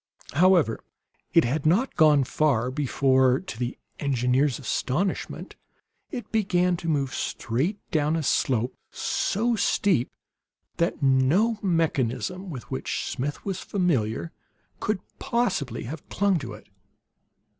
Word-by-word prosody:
However, 170 -6 +4 0.5
it - - +5
had 140 +5 -1
not 195 +12 +2
gone 150 -3 +5
far 130 -3 +1
before, 130 -2 +3
to 150 -11 -8
the 125 0 -3 0.2
engineer's 130 -1 +1
astonishment, 140 - -2 0.5
it 250 -6 -7
began 180 -4 +2
to 165 - -6
move 140 -4 0
straight 140 - -1
down 155 -2 +2
a 160 - -1
slope 125 -3 +1 0.2
so 230 +4 0
steep 195 - +2 0.7
that 170 -2 0
no 145 - +3
mechanism 165 - 0
with 130 -7 -6
which - - -2
Smith 140 +3 -4
was 190 -2 -2
familiar 160 - 0 0.5
could 210 -2 -1 0.2
possibly 235 - -1
have 145 +6 -8
clung 200 -3 +2
to 120 -6 -7
it. 105 - -12
150 Hz, 120 wpm, -26 LUFS, 130-185 Hz, 0.7 s, it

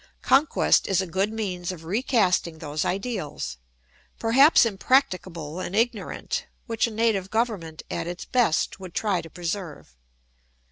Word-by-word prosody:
Conquest 280 +3 +3
is 190 -2 +2
a 190 - 0
good 190 +4 -1
means 185 -5 -3
of 170 -3 -9
recasting 190 -5 +1
those 155 -1 -3
ideals, 185 - -3 0.6
perhaps 265 +6 +6
impracticable 185 - 0
and 185 +1 -4
ignorant, 225 -3 -1 0.2
which 230 -1 0
a - - -6
native 215 -4 +1
government 205 -9 -2
at 170 0 -3
its 175 0 -5
best 235 -8 +1
would 185 -3 -10
try 200 -5 +1
to 165 - -11
preserve. 170 - -5
190 Hz, 135 wpm, -25 LUFS, 170-225 Hz, 0.6 s, perhaps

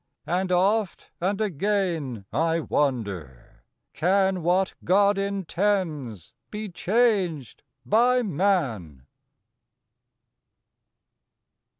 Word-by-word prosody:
And 180 +4 -1
oft 195 +2 +1
and 195 +3 0
again 175 - -1
I 165 +2 +1
wonder, 100 - -3 0.3
Can 190 +2 +2
_What 180 +2 +1
God 200 +2 +3
intends 185 - -2 0.2
be 210 0 -5
changed 185 - 0 0.2
by 245 - +3
man? 140 - -1
180 Hz, 70 wpm, -25 LUFS, 140-200 Hz, 0.3 s, God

